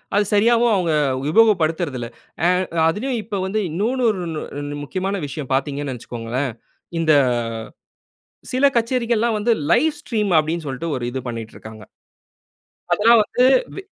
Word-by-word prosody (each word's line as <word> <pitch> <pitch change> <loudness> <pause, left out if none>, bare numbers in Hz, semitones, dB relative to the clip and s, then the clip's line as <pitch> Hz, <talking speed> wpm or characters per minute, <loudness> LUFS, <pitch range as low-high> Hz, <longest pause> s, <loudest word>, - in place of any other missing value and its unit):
அது 205 0 +3
சரியாவும், 230 +3 +4
அவுங்க 175 -4 0 0.4
உபயோகப்படுத்துறதில்ல. 165 - +2 0.4
ஆ - - +5 0.4
அதிலயும் 240 +9 -2
இப்ப 205 -2 -4
வந்து, 200 +3 -1
இன்னோன்னு, 225 +11 -1
ஓருணு 175 -7 -3 0.2
ரென் 145 0 -5
முக்கியமான 190 +6 -3
விஷயம் 140 -1 -7
பார்த்தீங்கன்னு 140 +1 -1
நினைச்சிக்கோங்களேன். 120 +2 -4 0.5
இந்த, 160 -1 +2 1.4
சில 255 +2 +1
கச்சேரிகள்லாம் 235 -1 +1
வந்து, 225 +3 +2 0.2
லைவ் 300 +6 +3
ஸ்ட்ரீம் 210 -8 -1
அப்டின்சொல்ட்டு, 155 -1 -4
ஒரு 125 - -4
இது 130 - -3
பண்ணிட்ருக்காங்க. 110 -2 -8 1.1
அதெல்லாம் 230 +2 +5
வந்து, 250 +4 +2 0.3
வெ 390 - -6
180 Hz, 120 wpm, -21 LUFS, 145-230 Hz, 1.4 s, ஆ